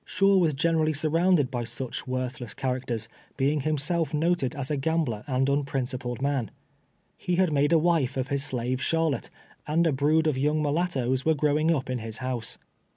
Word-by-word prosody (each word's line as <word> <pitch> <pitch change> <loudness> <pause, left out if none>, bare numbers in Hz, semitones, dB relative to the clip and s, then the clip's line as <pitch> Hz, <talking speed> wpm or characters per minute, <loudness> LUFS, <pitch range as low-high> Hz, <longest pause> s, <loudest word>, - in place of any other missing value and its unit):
Shaw 195 0 +3
was 165 -6 +2
generally 155 +1 +2
surrounded 160 0 +2
by 120 -2 -2
such 120 +3 -5
worthless 130 -3 -4
characters, 125 -4 -2 0.3
being 145 +2 +1
himself 155 +2 0
noted 155 -4 0
as 140 0 -4
a - - +1
gambler 145 -6 -1
and 135 -1 +1
unprincipled 130 -3 -2
man. 140 -5 0 0.7
He 180 - -1
had 180 -3 +2
made 145 +1 +2
a 165 - +6
wife 155 -6 +1
of 130 0 -2
his 140 -1 0
slave 130 -1 -2
Charlotte, 165 -6 0 0.4
and 165 +3 +2
a 165 - +3
brood 150 +4 +2
of 150 -4 +1
young 150 +3 +1
mulattoes 145 -5 0
were 160 0 +3
growing 150 +2 +2
up 140 -6 0
in 130 -1 -2
his 110 -1 -5
house. 130 -2 -4
140 Hz, 175 wpm, -27 LUFS, 130-160 Hz, 0.7 s, a